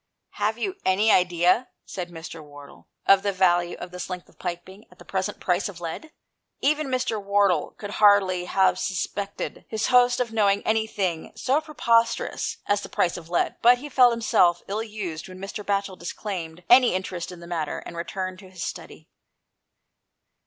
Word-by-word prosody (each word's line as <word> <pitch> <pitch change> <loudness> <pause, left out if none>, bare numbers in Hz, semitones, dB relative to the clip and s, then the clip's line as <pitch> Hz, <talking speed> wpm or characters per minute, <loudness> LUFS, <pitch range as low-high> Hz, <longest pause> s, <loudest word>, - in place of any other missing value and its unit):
" - - -56
Have 215 +2 +1
you 375 +11 -3
any 205 +4 +3
idea," 180 +6 +3 0.2
said 180 -2 -6
Mr. 165 -1 -9
Wardle, 145 -1 -14
" - - -52
of 195 -1 +7
the 200 - 0
value 175 -2 +2
of 180 - -8
this 180 +1 -6
length 180 -1 -6
of - - -25
piping, 180 +3 -6
at 180 - -20
the - - -15
present 190 +1 -3
price 180 +2 0
of 180 -4 -10
lead? 175 - -6 0.3
" - - -56
Even 305 -1 0
Mr. 250 -5 -1
Wardle 200 -5 +2
could 205 -1 -7
hardly 200 -4 +4
have 190 +1 +2
sus 190 - -1
pected 200 -1 -6
his 220 -1 -1
host 245 0 +5
of 235 -2 -2
knowing 205 -2 +2
anything 205 -6 -1
so 275 +4 +1
pre 310 -1 -13
posterous 230 -2 +1
as 205 0 +1
the - - -8
price 175 - +1
of 170 -2 -9
lead, 175 - 0
but 245 +1 +7
he 290 +4 -8
felt 255 -2 +6
himself 190 -7 +2
ill 210 +3 -2
used 200 -8 -6
when 185 - -10
Mr. 195 +2 -6
Batchel 200 -2 -2
disclaimed 175 -2 -6
any 245 -5 +6
interest 185 -2 -4
in 180 - -10
the 170 - -11
matter, 165 -3 -3
and 170 - -8
returned 185 +2 -4
to 190 - -13
his 185 -2 -7
study. - - -7
195 Hz, 190 wpm, -25 LUFS, 175-220 Hz, 0.3 s, of